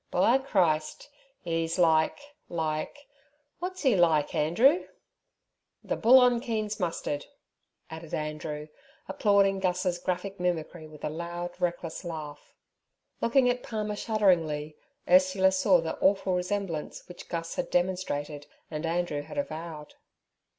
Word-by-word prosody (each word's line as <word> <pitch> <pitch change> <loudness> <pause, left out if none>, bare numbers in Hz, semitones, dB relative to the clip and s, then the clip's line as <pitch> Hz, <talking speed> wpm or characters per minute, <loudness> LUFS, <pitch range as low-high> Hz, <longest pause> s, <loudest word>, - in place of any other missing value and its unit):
'By 235 +9 +3
Christ! 175 - 0 0.3
'e's 165 0 -1
like—like—wot's 285 - -2
'e 255 -5 +5
like, 165 -5 +3
Andrew?' 235 - +3 1.0
'The - - -2
bull 240 +3 +6
on 245 -1 +4
Keen's 215 -4 -3
mustard' 165 -5 -3 0.6
added 160 0 -9
Andrew, 150 0 -4 0.4
applauding 200 -2 +3
Gus's 180 -1 0
graphic 185 +2 -3
mimicry 170 -2 -2
with 155 -1 -14
a - - -1
loud, 170 +2 -5
reckless 175 -2 -2
laugh. 155 -4 -8 0.7
Looking 250 +2 +3
at 245 0 +1
Palmer 215 -3 -3
shudderingly, 165 -9 +1 0.3
Ursula 185 +1 +5
saw 190 -2 +4
the 165 - -4
awful 195 -1 +2
resemblance 180 -3 -3
which 180 - -11
Gus 165 -1 -4
had - - -3
demonstrated 175 -5 -1 0.2
and 155 +1 -3
Andrew 170 -3 -1
had 150 - -10
avowed. 160 - -5
175 Hz, 115 wpm, -28 LUFS, 160-210 Hz, 1.0 s, bull